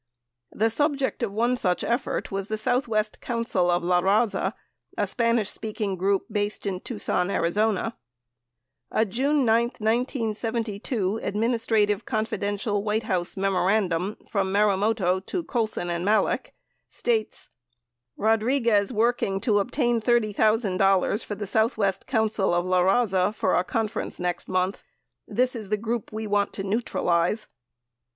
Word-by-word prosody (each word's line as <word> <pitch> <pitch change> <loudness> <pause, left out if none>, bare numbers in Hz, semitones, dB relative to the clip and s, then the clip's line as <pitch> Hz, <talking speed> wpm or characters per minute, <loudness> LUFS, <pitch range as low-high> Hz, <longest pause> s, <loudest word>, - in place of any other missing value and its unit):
The 225 +2 +1
subject 275 +1 0
of 230 -4 -1
one 235 +4 +1
such 180 -7 0
effort 235 +3 -1
was 195 0 -3
the 215 - -2
Southwest 225 -2 0
Council 230 -7 0
of 175 0 +1
LaRaza, 190 +5 +2 0.4
a - - +2
Spanish 230 -4 +1
speaking 215 -3 -3
group 195 +2 +1
based 205 0 -2
in 190 -2 -2
Tucson, 195 -5 -1
Ariz. 170 0 0 1.3
A 220 - +2
June 270 +7 +1
9, 225 0 +4 0.2
1972, 225 -2 -1
"Administrative 220 -1 +1
Confidential" 205 -2 -1
White 215 +1 0
House 185 -4 -1
memorandum 195 -1 +1
from 195 -2 -1
Marumoto 200 -2 +2
to 350 - -3
Colson 220 - -2
and 170 0 -2
Malek 210 +3 +1 0.3
states: 225 -3 -2 0.7
Rodriguez 225 -1 +2
working 225 -4 +1
to 210 -4 +2
obtain 240 +2 0
$30,000 215 -3 +2
for 205 - -5
the 205 - -5
Southwest 215 -2 0
Council 220 -7 +1
of 175 0 +1
LaRaza 190 +2 +2
for 190 - +1
a 180 - +2
conference 220 +3 -3
next 180 -1 -3
month. 185 +1 0 0.5
This 255 +1 0
is 215 -4 -6
the 210 - +1
group 230 +1 -3
we 220 0 -4
want 205 -1 0
to 195 - -4
neutralize. 195 -2 0
215 Hz, 130 wpm, -25 LUFS, 195-230 Hz, 1.3 s, 9